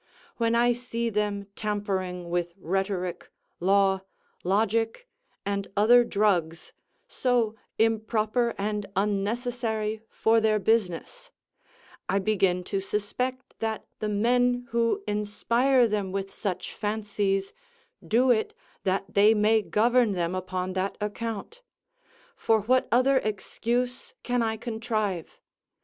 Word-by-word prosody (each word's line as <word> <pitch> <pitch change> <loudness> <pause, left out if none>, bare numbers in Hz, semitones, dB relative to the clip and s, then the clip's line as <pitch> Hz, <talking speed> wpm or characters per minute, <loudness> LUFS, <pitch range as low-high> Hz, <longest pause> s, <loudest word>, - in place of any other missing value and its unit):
When 230 0 +2
I 240 +1 +4
see 235 -1 -3
them 205 -1 -1
tampering 190 -4 -3
with 175 -1 -1
rhetoric, 185 -1 -2 0.3
law, 195 +1 +3 0.4
logic, 225 - 0 0.4
and 200 0 -2
other 240 +4 +7
drugs, 185 -7 0 0.3
so 240 -4 +1 0.2
improper 225 +1 +1
and 210 0 -2
unnecessary 220 +2 -1
for 225 0 +2
their 215 -1 +3
business, 220 - -1 0.8
I 195 - +2
begin 190 -3 +1
to 195 +2 -2
suspect 215 +6 -3
that 220 -1 -2
the 215 - -2
men 245 +4 +2
who 235 - +1
inspire 235 +5 +2
them 205 -3 -2
with 195 0 -4
such 190 -5 -4
fancies, 205 -2 -1 0.5
do 250 +3 +3
it 220 -2 +1 0.3
that 195 +1 -1
they 210 +2 +6
may 215 +1 +4
govern 235 +1 +3
them 175 -1 -1
upon 185 0 -3
that 190 +1 -2
account; 225 - -4 0.7
for 220 -1 +2
what 255 +5 +2
other 255 +3 +4
excuse 245 - -2
can 245 -1 0
I 220 -1 0
contrive? 220 -6 -3
215 Hz, 115 wpm, -27 LUFS, 195-235 Hz, 0.8 s, other